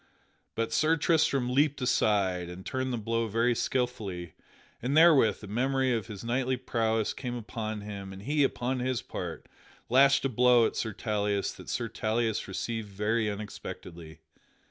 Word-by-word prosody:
But 115 0 -1
Sir 160 +2 +3
Tristram 140 -6 +2
leaped 145 +1 +2
aside 95 -8 +1
and 90 +1 -9
turned 130 0 -2
the 120 - -1
blow 115 +1 -1
very 115 +3 +2
skilfully; 105 -10 -2 0.5
and 135 +5 0
therewith 145 - +5
a - - -7
memory 130 +4 +1
of 110 -5 -2
his 105 -1 -8
knightly 125 +2 0
prowess 115 -3 0
came 125 -2 -5
upon 110 -2 -5
him 100 -2 -7
and 95 0 -10
he, 145 +3 +2
upon 130 -1 -1
his 125 -1 -1
part, - - -6 0.4
lashed 135 +2 +5
a - - +2
blow 125 -1 +5
at - - -2
Sir 110 - -2
Tauleas 105 -1 -1
that - - -11
Sir 120 - -1
Tauleas 115 0 -1
received 110 +2 -4
very 105 +3 0
unexpectedly. 85 -6 -8
115 Hz, 160 wpm, -29 LUFS, 105-130 Hz, 0.5 s, therewith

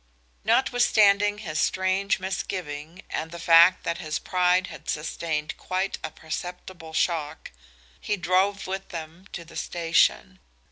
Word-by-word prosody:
Notwithstanding 210 -5 +3
his 160 -8 -3
strange 190 +1 +1
misgiving 180 -3 -5
and 160 - -3
the 170 - -8
fact 170 +2 +6
that 170 - -2
his 155 -2 -2
pride 180 0 +2
had - - -10
sustained 155 0 -3
quite 185 +1 -2
a 155 - -3
perceptible 165 +1 -7
shock, 155 - -1 0.5
he 210 - -2
drove 185 +3 +1
with 190 +1 -5
them 165 +3 -8
to 170 - -6
the - - -15
station. 170 -1 +1
180 Hz, 130 wpm, -26 LUFS, 160-190 Hz, 0.5 s, fact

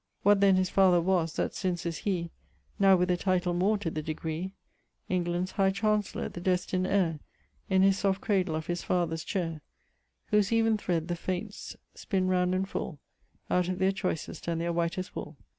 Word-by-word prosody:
What 205 0 +5
then 195 -1 +6
his 185 -1 +1
father 185 -3 +5
was, 170 -2 +1
that - - -1
since 180 -2 -2
is 170 -1 -3
he, 175 -4 -2 0.5
Now 195 -1 +6
with 180 0 +2
a 180 - +2
title 180 -1 +1
more 195 +5 +2
to 190 -5 -3
the 155 - -3
degree, 160 +4 -4 0.5
England's 180 0 -1
High 195 -1 +2
Chancellour, 210 +1 0
the 175 - -8
destin'd 185 0 0
heir 180 -6 +1 0.5
In 190 0 +4
his 195 0 +4
soft 195 -1 +1
cradle 185 -6 0
of 160 0 -3
his 175 0 -2
father's 165 -3 -1
chaire, 165 -5 -3 0.7
Whose 210 -1 +3
even 225 -1 +3
thred 170 -6 -1
the 175 - -1
Fates 185 +4 -5 0.2
spinne 190 -2 -1
round 180 0 +2
and 190 +1 0
full 180 -4 -4 0.5
Out 180 0 +1
of 185 - -2
their 190 +1 +3
choysest 185 -5 -4
and 165 -1 0
their 170 0 -1
whitest 170 +2 -2
wooll. 150 0 -6
185 Hz, 185 wpm, -29 LUFS, 170-195 Hz, 0.7 s, then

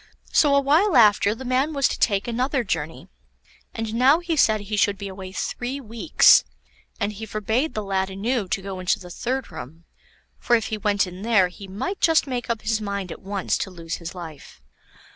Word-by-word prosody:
So 285 -2 +4
a - - +6
while 305 +5 +3
after 210 -2 +5
the 260 - -9
man 260 +5 +1
was 275 -2 +2
to - - -4
take 200 -1 +1
another 250 +3 0
journey, 160 - -4 0.6
and 225 -1 -4
now 260 +6 +5
he 345 -1 -2
said 220 -7 +3
he 210 +1 -4
should 200 -1 +2
be 200 - -6
away 190 -1 -8
three 245 +7 -4
weeks, 235 +4 +4 0.6
and 205 -1 -1
he 220 +2 -8
forbade 220 +8 -1
the 215 - -2
lad 190 -1 -1
anew 210 +3 -2
to 190 +1 -2
go 190 -1 -6
into 185 +3 +1
the 180 -3 -11
third 255 +6 -3
room, 160 +6 -10 0.6
for 240 - +3
if 225 -2 -1
he 220 - -2
went 205 -1 +1
in 180 +1 -9
there 205 -5 +3
he 195 +2 -11
might 355 - -4
just 325 -2 +4
make 250 -4 -4
up 230 -2 -2
his 220 0 0
mind 200 -3 -4
at - - -9
once 195 -1 -2
to - - -3
lose 170 -2 -6
his 170 +2 -8
life. 165 -5 -10
215 Hz, 205 wpm, -23 LUFS, 190-250 Hz, 0.6 s, a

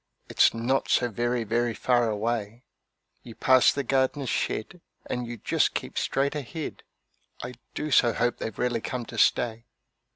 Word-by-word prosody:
It's - - +5
not 120 +4 -1
so 125 - +3
very, 120 +2 -1
very 115 +1 0
far 120 -2 +2
away; 110 +1 -3 0.6
You 115 -2 -12
pass 130 -1 +5
the 140 - -2
gardner's 135 +1 0
shed 170 +10 -3 0.2
and 125 -1 -3
you 120 0 -6
just - - 0
keep - - -4
straight 140 +1 0
ahead 150 +2 -6 0.6
I 125 - -6 0.2
do 150 0 -3
so 120 -2 +5
hope 120 +1 -1
they've 110 - -5
really 120 -2 0
come 125 0 -4
to - - -6
stay. 115 -1 +2
120 Hz, 160 wpm, -26 LUFS, 115-130 Hz, 0.6 s, It's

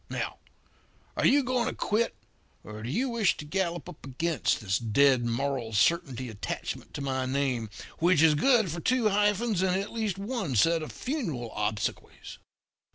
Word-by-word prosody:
Now, - - -4 0.8
are - - +3
you 280 +2 +4
going 250 -1 0
to - - -3
quit, 225 +3 0 0.5
or 105 0 -9
do 115 - -5
you 255 - 0
wish 230 -5 +2
for - - -19
to 150 - -7
gallop 175 0 -2
up 180 -4 -11
against 150 +2 -1
this 100 -2 0
Dead 125 +3 +3
Moral 120 -1 -2
Certainty 130 +1 +1
attachment 110 -3 -5
to - - -4
my 130 -1 -1
name, 130 -4 -1 0.3
which 170 -2 +4
is 160 -2 +6
good 220 - +3
for 170 - -4
two 250 +3 +2
hyphens 210 0 +1
and 190 0 +2
at 200 - -5
least 215 -5 -2
one 200 - -3
set 165 +9 +4
of 155 - -6
funeral 170 - -4
obsequies?' 105 0 -4
165 Hz, 170 wpm, -28 LUFS, 130-210 Hz, 0.8 s, is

